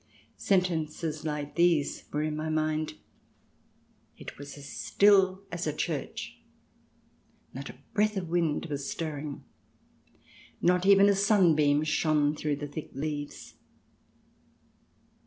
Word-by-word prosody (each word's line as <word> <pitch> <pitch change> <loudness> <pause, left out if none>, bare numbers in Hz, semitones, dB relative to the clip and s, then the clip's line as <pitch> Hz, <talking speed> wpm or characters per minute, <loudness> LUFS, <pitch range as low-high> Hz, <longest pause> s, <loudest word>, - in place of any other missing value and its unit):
Sentences 165 -5 0
like 150 -1 -3
these 170 -4 +2
were 150 +1 -1
in 155 0 -2
my 155 +1 -3
mind: 155 0 -1 0.6
" - - -38
It - - -9
was 145 +1 -9
as 140 -1 -10
still 195 -1 +3
as 175 -1 -3
a 155 - 0
church.... 155 -2 -4 1.1
Not 135 +2 -7
a - - -10 0.2
breath 215 0 +2
of 180 -3 -3
wind 165 -2 0
was 140 -3 -4
stirring... 150 -3 -5 1.2
not 180 +1 +2
even 200 0 +7
a 200 - +5
sun 195 -3 +4
beam 145 0 +3
shone 155 -1 +2
through 150 -1 -1
the 145 +1 -6
thick 145 +2 -7
leaves. 145 +1 -5
155 Hz, 125 wpm, -29 LUFS, 150-180 Hz, 1.2 s, even